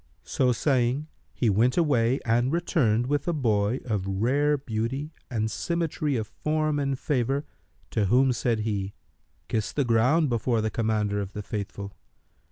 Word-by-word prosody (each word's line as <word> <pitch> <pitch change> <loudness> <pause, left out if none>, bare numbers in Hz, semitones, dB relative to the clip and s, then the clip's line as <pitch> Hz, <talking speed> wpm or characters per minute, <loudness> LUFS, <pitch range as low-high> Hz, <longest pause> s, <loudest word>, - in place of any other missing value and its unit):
So 125 -2 +1
saying 130 +3 +1 0.2
he 120 - -1
went 115 - +3
away 135 -6 +3
and 120 +3 +2
returned 135 - +1
with 145 +3 -1
a 175 - +2
boy 110 -4 +1
of 105 -6 -2
rare 135 +10 +2
beauty 135 +4 -3 0.2
and 110 -3 -1
symmetry 165 -4 -1
of 110 -3 -1
form 155 +6 -1
and 140 -1 -1
favour 135 +1 0 0.5
to 105 - +1
whom 130 +6 +4
said 115 -2 0
he, 100 -2 -2 0.5
"Kiss 110 -2 -1
the 140 - 0
ground 125 +8 +3
before 120 -1 0
the 110 0 -1
Commander 105 -2 0
of 100 0 -6
the 105 - -5
Faithful." 100 -1 -5
120 Hz, 155 wpm, -26 LUFS, 110-145 Hz, 0.5 s, whom